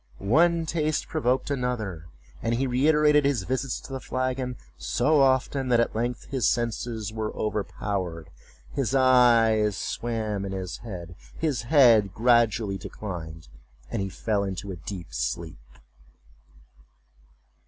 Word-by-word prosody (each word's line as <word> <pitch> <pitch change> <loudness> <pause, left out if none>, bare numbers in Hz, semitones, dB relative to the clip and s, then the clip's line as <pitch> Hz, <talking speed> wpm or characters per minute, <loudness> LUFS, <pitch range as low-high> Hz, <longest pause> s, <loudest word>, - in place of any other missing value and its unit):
One 165 - +3
taste 155 -2 -1
provoked 130 -3 0
another; 110 - -3 0.3
and 115 +1 0
he 130 +3 0
reiterated 150 +3 +4
his 140 -8 +1
visits 130 +3 -2
to 135 - -10
the 135 - -3
flagon 130 -1 -2 0.2
so 65 - +2
often 130 0 +2
that 120 -2 +3
at 115 - +1
length 120 +1 -2
his 130 -4 +1
senses 115 -2 -2
were 110 -1 -3
overpowered, 100 -5 -3 0.4
his 135 -2 -1
eyes 115 -5 +4
swam 110 -4 -3
in 95 -1 -4
his 95 -3 -4
head, 90 -7 -8 0.2
his 150 -6 -1
head 115 - +5
gradually 110 -4 +2
declined, 80 -6 -7 0.4
and - - -1
he 95 - -2
fell 105 +1 -1
into 95 0 -4
a - - -5
deep 85 -4 -8
sleep. 65 +4 -3
115 Hz, 130 wpm, -26 LUFS, 100-130 Hz, 0.4 s, head